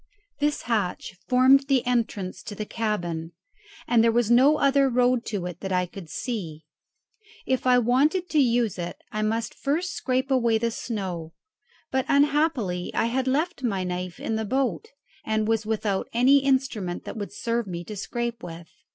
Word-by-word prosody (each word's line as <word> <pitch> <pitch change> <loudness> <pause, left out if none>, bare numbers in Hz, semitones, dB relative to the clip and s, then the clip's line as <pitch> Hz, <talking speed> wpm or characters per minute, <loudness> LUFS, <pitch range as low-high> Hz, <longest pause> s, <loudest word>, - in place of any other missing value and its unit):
This 295 0 0
hatch 210 -6 -2
formed 265 +2 +5
the 265 -3 +2
entrance 225 -6 -1
to 205 - -6
the 215 - -4
cabin, 175 -8 -3 0.5
and 235 -5 +4
there 230 - +4
was 240 0 +1
no 270 +6 +6
other 275 -1 +3
road 245 -1 +2
to 200 -5 -3
it 180 -1 -6
that 190 - -5
I 180 -1 +2
could 175 -2 -11
see. 165 -12 -5 0.8
If 260 0 0
I 250 0 +6
wanted 275 +10 +2
to 310 - +3
use 235 -7 +2
it 175 0 -4
I 215 - -2
must 225 +2 -1
first 335 +7 -1
scrape 260 +1 -1
away 235 -4 +3
the 230 +1 -1
snow; 185 -9 -5 0.6
but 265 -1 0
unhappily 280 - +2
I - - +2
had 265 0 0
left 305 +5 0
my 200 -7 -1
knife 180 -1 -4
in 220 - -2
the 220 - -1
boat, 240 - -1 0.4
and 220 -1 0
was 220 -1 0
without 210 -3 -1
any 260 +4 +5
instrument 260 -9 0
that - - -6
would 205 -2 -5
serve 235 -2 -2
me 175 -2 -5
to 210 - -8
scrape 235 +3 -4
with. 165 -1 -9
230 Hz, 175 wpm, -25 LUFS, 195-260 Hz, 0.8 s, no